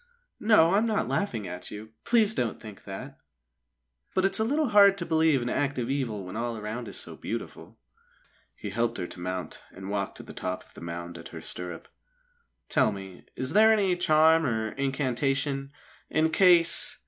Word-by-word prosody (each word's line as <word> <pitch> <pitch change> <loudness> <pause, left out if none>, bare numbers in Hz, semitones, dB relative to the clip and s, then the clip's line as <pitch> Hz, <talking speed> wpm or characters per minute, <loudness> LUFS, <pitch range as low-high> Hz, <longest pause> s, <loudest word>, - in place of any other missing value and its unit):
"No, 200 -6 +5
I'm 215 +3 +3
not 215 -2 0
laughing 115 - -2
at 90 0 -7
you. 110 +1 -9
Please 220 -3 +3
don't 120 - -2
think 105 -3 -11
that! 130 +8 -8 1.0
But 185 - +3
it's 195 - +1
a - - +3
little 290 +4 +1
hard 200 -2 +7
to 170 - -4
believe 160 -5 +3
in - - -3
active 130 -1 -1
evil 115 -8 -2
when 90 - -8
all 115 0 -2
around 110 +3 -5
is - - -7
so - - -7
beautiful." - - -7 0.8
He - - -6
helped 120 0 0
her - - -3
to 90 - -9
mount 90 +1 -5
and 95 +1 -8
walked 100 -1 -2
to - - -9
the - - -11
top 90 0 -4
of - - -25
the - - -12
mound 85 0 -6
at 85 - -9
her - - -9
stirrup. 90 -2 -7 0.8
"Tell - - +3
me, 95 -2 -9
is 130 +2 -4
there 220 +2 +7
any 200 -4 +3
charm 160 -1 +4
or 110 -2 -1
incantation, 135 0 -1 0.4
in 160 +1 +2
case 175 -2 +4
135 Hz, 185 wpm, -27 LUFS, 105-175 Hz, 1.0 s, hard